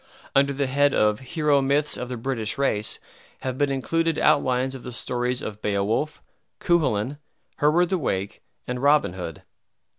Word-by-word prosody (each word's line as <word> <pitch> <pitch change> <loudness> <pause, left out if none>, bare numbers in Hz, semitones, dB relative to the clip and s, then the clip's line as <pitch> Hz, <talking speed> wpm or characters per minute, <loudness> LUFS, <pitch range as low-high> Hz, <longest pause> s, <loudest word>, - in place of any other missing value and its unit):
Under 140 +1 +4
the 140 0 -1
head 140 +2 +2
of 105 0 +3
"Hero 145 +1 +1
Myths 140 +2 +1
of 125 - -5
the 125 - -4
British 115 -2 -2
Race" 110 -6 0 0.4
have 130 -1 -3
been 145 +1 +1
included 165 +4 0
outlines 130 -1 +2
of 135 - -8
the 125 - -7
stories 125 +1 -2
of 105 0 -6
Beowulf, 105 +9 -1 0.4
Cuchulain, 140 - +1 0.4
Hereward 165 +4 +3
the 185 -1 0
Wake, 100 - -2 0.2
and 125 0 -4
Robin 145 -9 +4
Hood. 85 -4 -7
130 Hz, 155 wpm, -24 LUFS, 115-145 Hz, 0.4 s, Under